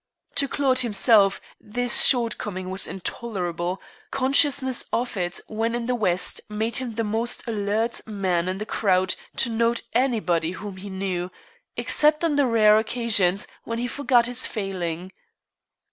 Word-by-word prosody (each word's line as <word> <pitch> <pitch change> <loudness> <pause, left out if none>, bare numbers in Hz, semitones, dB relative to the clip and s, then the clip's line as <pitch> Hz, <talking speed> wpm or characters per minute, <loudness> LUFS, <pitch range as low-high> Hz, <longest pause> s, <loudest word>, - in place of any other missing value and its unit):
To 280 - +3
Claude 265 -2 +1
himself 210 -3 +4 0.2
this 245 +3 +2
short 235 -4 +4
coming 185 -2 -5
was 190 - +1
intolerable; 180 -3 -4 0.3
consciousness 265 -1 +3
of 240 0 -2
it 175 -1 -2
when 225 +2 -2
in 240 -1 -3
the 250 - 0
West 185 -7 0
made 220 +2 -2
him 250 -4 -4
the 230 - -1
most 225 +3 -2
alert 220 +1 -1
man 185 -5 -1
in 185 - -3
the 210 - -5
crowd 190 -4 +1 0.2
to 235 - 0
note 230 +1 +1
anybody 195 -10 0
whom 200 0 -8
he 200 +2 -9
knew, 190 -2 -3 0.5
except 300 +1 +2
on 310 -3 +1
the 285 -2 +3
rare 215 -2 +5
occasions 215 -5 +1 0.2
when 230 - -4
he 240 - -2
forgot 245 -1 +2
his 245 +1 +1
failing. 185 -4 -4
220 Hz, 150 wpm, -24 LUFS, 190-240 Hz, 0.5 s, rare